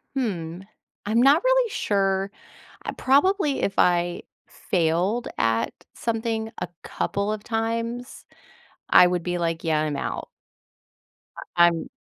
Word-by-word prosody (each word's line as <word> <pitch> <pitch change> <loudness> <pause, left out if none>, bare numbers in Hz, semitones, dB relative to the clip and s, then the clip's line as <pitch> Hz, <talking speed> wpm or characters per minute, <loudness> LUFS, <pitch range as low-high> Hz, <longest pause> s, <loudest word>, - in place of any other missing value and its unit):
Hmm, 180 -9 -3 0.4
I'm 220 +3 +2
not 280 +5 +6
really - - +3
sure. 195 - 0 0.5
I - - -3
probably, 290 +2 +2
if 195 - 0
I 175 0 +2 0.2
failed 180 +7 0
at 115 0 +1 0.2
something 225 -1 -2
a 180 - -3 0.2
couple 200 +1 -2
of 210 -1 -6
times, 230 +2 -3 0.6
I 180 - +8
would 180 -1 -1
be 175 0 -2
like, 165 -1 -2
"Yeah. 155 -2 +2
I'm 150 -2 -2
out." - - -4 1.3
I 175 0 +7
I'm 165 -1 -2
200 Hz, 125 wpm, -24 LUFS, 175-235 Hz, 1.3 s, I